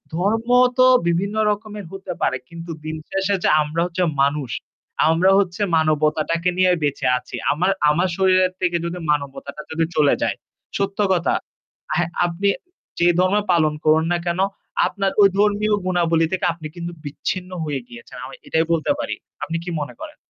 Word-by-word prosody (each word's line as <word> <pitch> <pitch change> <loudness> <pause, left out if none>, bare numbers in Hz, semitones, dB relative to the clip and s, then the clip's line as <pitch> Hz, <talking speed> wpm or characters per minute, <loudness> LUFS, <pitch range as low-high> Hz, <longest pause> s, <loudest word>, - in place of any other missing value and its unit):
ধর্ম 215 +6 0 0.3
তো 255 - +6 0.2
বিভিন্ন 190 +5 0 0.2
রকমের 210 -1 -5
হতে 195 -1 -6
পারে। 130 - +1
কিন্তু 170 0 -8
দিন 155 0 -3
শেষ 195 0 -1 0.2
যে - - +3
আমরা 150 +2 -1
হচ্ছে 180 +1 -1 0.2
মানুষ। 140 -3 -1 0.6
আমরা 170 +4 +4
হচ্ছে 185 0 -1 0.2
মানবতাটাকে 155 +2 +1
নিয়ে 185 0 +4
বেঁচে 145 -1 -1
আছি। 125 0 -8 0.2
আমার 180 +6 +1 0.2
আমার 170 +5 +2
শরীরের 185 -1 +3
থেকে 175 -1 +1
যদি 175 +1 -4
মানবতাটা 140 0 -3
যদি 160 +1 +1
চলে 145 -2 +4
যায়। - - 0 0.4
সত্য 200 0 -2
কথা 175 -2 +1 0.6
হ্যাঁ, 175 0 +1 0.2
আপনি 175 +4 0 0.5
যে 170 - +4
ধর্মই 195 +3 +3
পালন 155 -3 +3
করুন 155 +1 +4
না - - +2
কেন 170 +1 -1 0.5
আপনার 195 -1 -1
ওই 200 - +9
ধর্মীয় 210 +1 +3
গুণাবলী 170 -3 +2
থেকে 185 - 0
আপনি 160 -2 -8
কিন্তু 170 0 -5
বিচ্ছিন্ন 180 +5 -4
হয়ে 145 -3 -3
গিয়েছেন। 120 -1 -12
আমি 130 - -9
এটাই 160 0 +1
বলতে 165 - +1
পারি। 290 - -3 0.3
আপনি 165 - -2
কি 180 - -6
মনে 145 - -5
করেন? 310 -1 -8
170 Hz, 165 wpm, -21 LUFS, 155-190 Hz, 0.6 s, ওই